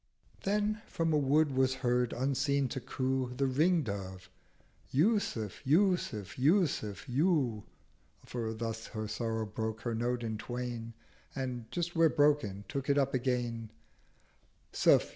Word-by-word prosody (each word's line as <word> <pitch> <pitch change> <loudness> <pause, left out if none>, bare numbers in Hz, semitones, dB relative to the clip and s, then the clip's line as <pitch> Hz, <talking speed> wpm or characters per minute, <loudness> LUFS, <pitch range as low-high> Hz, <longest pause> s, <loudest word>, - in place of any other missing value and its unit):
Then 210 +1 +1
from 165 -1 0
a - - +4
Wood 145 +2 +3
was 130 0 +3
heard 125 0 +2
unseen 140 +1 +1
to 130 - -3
coo 130 -1 -2
The 140 - +1
Ring 155 +6 +3
dove—'Yúsuf! 105 - -3
Yúsuf! 145 - +1
Yúsuf! 140 - +2
Yú 130 - +1 0.3
' - - -28
(For 115 -2 -3
thus 110 0 -4
her 110 0 -2
sorrow 115 0 -2
broke 110 +1 -4
her 120 - -2
Note 120 +1 -1
in 110 -2 -3
twain, 120 -1 -5 0.4
And, 125 -4 -4
just 175 0 -3
where 165 -1 +5
broken, 145 -11 +2
took 140 0 -4
it 140 - +4
up 135 -1 +2
again) 120 -3 -1 0.5
' - - -37
suf! - - +5
130 Hz, 140 wpm, -32 LUFS, 115-145 Hz, 0.5 s, where